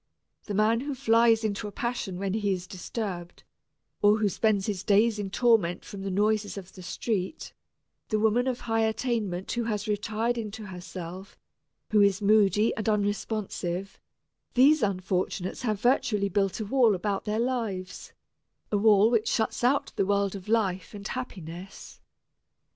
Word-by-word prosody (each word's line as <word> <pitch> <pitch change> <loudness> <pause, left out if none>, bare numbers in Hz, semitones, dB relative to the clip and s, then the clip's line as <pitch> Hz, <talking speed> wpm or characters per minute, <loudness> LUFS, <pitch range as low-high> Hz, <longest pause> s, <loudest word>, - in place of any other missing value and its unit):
The 205 - -4
man 215 +3 +3
who 280 +2 -4
flies 230 -1 +4
into 210 -1 -2
a - - -7
passion 235 -5 -3
when 195 0 -2
he 205 -2 0
is 180 -1 -5
disturbed, 180 -2 -6 0.6
or 210 +1 +5
who 210 -2 +1
spends 205 -1 +1
his 200 -4 -3
days 215 +2 +3
in 200 -2 -3
torment 215 -5 +2
from 200 -4 -8
the 195 - -3
noises 205 +2 0
of 190 -1 -9
the 185 - -11
street; 190 - -3 0.6
the 215 - +1
woman 220 +4 +2
of 250 -1 -2
high 225 -1 0
attainment 220 -5 -1
who 235 -1 -1
has 210 -1 -2
retired 215 +3 -1
into 215 -1 -6
herself, 185 0 -8 0.5
who 210 -1 +5
is 200 -1 +4
moody 210 +1 +3
and 220 0 -1
unresponsive, 205 -3 -2 0.6
these 285 +5 +6
unfortunates 185 -2 -1
have 215 -5 -1
virtually 220 -4 +2
built 195 -1 0
a 215 - -3
wall 235 -2 +4
about 195 +2 -2
their 210 0 -1
lives, 225 -7 -3 0.6
a 205 - +2
wall 215 +1 +5
which 225 -2 +2
shuts 225 +1 0
out 270 +3 +2
the 195 - +2
world 200 -1 +1
of 195 +1 -9
life 200 -4 0
and 200 -1 -6
happiness. 185 -7 -8
210 Hz, 160 wpm, -27 LUFS, 195-225 Hz, 0.6 s, these